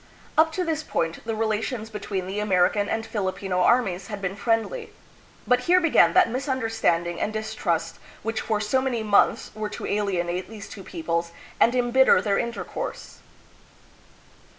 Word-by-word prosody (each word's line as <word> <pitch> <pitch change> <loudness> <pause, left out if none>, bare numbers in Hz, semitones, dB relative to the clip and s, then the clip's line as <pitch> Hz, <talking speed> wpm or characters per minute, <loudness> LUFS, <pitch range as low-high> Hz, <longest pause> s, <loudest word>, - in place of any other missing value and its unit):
Up 320 +1 +4
to 365 - -1
this 320 -2 -1
point, 165 - -2
the 225 - -1
relations 220 +1 -2
between 200 -3 -4
the 195 +3 -4
American 205 0 +2
and 225 0 -1
Filipino 190 -3 -2
armies 195 -3 +2
had 205 -2 -5
been 195 -1 -3
friendly. 225 - -1 0.5
But 250 0 +3
here 365 +1 +7
began 300 - +4
that - - +6
misunderstanding 225 - -1
and - - 0
distrust 170 -6 -2 0.2
which 225 +1 -2
for 215 -2 -1
so 215 +5 +1
many 245 -4 -1
months 205 -2 +3
were 215 -1 -4
to - - -6
alienate 185 -3 -1
these 215 -3 -9
two 195 - -10
peoples 170 0 -3 0.3
and 240 - +4
imbitter 250 +1 +5
then 200 -2 +1
intercourse. 235 - -5
215 Hz, 150 wpm, -25 LUFS, 185-235 Hz, 0.5 s, here